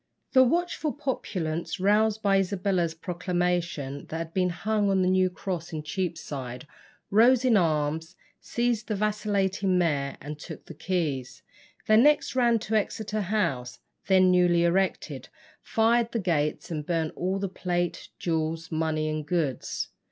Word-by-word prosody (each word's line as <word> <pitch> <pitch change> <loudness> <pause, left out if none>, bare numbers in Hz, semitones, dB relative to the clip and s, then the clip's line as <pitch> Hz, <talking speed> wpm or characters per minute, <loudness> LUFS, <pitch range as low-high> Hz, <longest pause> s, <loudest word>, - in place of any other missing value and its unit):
The 260 - +6
watchful 315 +2 +1
populace, 180 - -3
roused 210 +3 +2
by 195 -1 +4
Isabella's 185 -3 0
proclamation 175 -5 -2
that 160 - -4
had 165 0 -5
been 180 -1 +2
hung 205 +3 0
on 190 -1 +3
the - - +2
new 185 0 +3
cross 180 -2 -5
in 155 -2 -4
Cheapside, 150 -6 -4 0.5
rose 240 +5 +5
in 245 -3 +5
arms, 160 -1 0 0.2
seized 235 -2 -1
the 215 - -1
vacillating 200 -2 0
mayor, 145 -6 0
and 150 +1 -7
took 160 0 -9
the - - -9
keys. 150 -7 -3 0.4
They 215 - +5
next 290 +3 +4
ran 240 -2 +4
to 220 - -4
Exeter 215 0 -1
House, 170 -12 -1 0.3
then 185 -1 +5
newly 175 -1 +4
erected, 185 +3 0 0.3
fired 230 +1 +2
the - - +1
gates, 160 -5 -1
and 155 -2 -3
burnt 160 0 -1
all 185 +2 -1
the 195 0 -2
plate, 175 -2 -2
jewels, 165 -1 -2
money, 155 -1 0
and 155 0 -2
goods. 150 -4 -2
180 Hz, 145 wpm, -27 LUFS, 160-210 Hz, 0.5 s, The